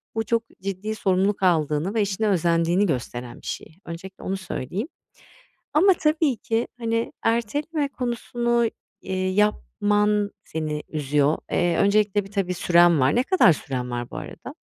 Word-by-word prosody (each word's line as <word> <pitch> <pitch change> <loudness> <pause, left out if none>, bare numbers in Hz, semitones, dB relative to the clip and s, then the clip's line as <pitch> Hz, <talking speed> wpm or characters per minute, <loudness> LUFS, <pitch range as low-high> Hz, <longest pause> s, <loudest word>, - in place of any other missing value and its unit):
Bu 225 - 0
çok 230 0 +1 0.2
ciddi 195 +3 -3
sorumluluk 195 0 +1
aldığını 160 +1 +2
ve 225 - +2
işine 205 +2 0
özendiğini 170 +1 +2
gösteren 125 -5 -4
bir - - -11
şey. 160 - -6
Öncelikle 180 +3 -9
onu 190 +1 -2
söyleyeyim. 190 - -4 0.9
Ama 375 +5 +5
tabii 310 -4 +1
ki, 225 +1 -1
hani, 230 0 -1
erteleme 285 +7 0
konusunu, 240 -2 -1 0.3
eee, 185 0 -2
yapman 210 0 +1
seni 155 -1 -3
üzüyor. 150 0 +1
Eee, 175 -1 +2
öncelikle, 205 0 +3
bir 195 - -14
tabii 190 -3 -1
süren 175 -2 +4
var. 130 +3 +3
Ne 245 - +4
kadar 290 - +5
süren 125 -4 -4
var, 120 0 -4
bu - - -7
arada? - - -8
195 Hz, 145 wpm, -24 LUFS, 165-225 Hz, 0.9 s, Ama